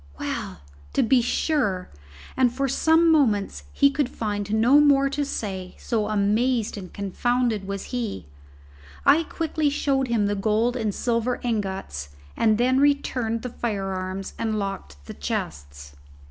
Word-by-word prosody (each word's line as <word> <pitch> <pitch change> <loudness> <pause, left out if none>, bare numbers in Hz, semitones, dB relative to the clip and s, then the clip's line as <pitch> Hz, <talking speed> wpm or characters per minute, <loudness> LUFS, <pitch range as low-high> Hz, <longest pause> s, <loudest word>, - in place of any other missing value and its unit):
Well, - - -4 0.3
to - - +3
be 245 +2 +4
sure!" 230 - 0 0.4
And 255 -2 +3
for 275 +2 -1
some 320 +5 +4
moments 220 -11 +1
he 280 0 +4
could 280 -2 0
find 205 -3 -3
no 235 +6 +5
more 275 -2 +4
to 290 +1 -1
say, 190 -9 -5
so 220 -3 -1
amazed 215 +3 +1
and 190 -3 -8
confounded 220 +1 -1
was 200 -1 -4
he. 220 - -3 0.8
I 310 - +6
quickly 315 -2 -1
showed 275 -2 0
him 230 -4 +1
the 205 - 0
gold 215 +4 +1
and 220 -4 -1
silver 235 +3 -1
ingots 190 - -3 0.2
and 220 -2 +3
then 255 +3 +3
returned 255 -5 +1
the 250 - -3
firearms 195 -4 -4
and 220 -1 -1
locked 70 - -5
the - - -8
chests. 70 0 -5
225 Hz, 145 wpm, -24 LUFS, 195-260 Hz, 0.8 s, I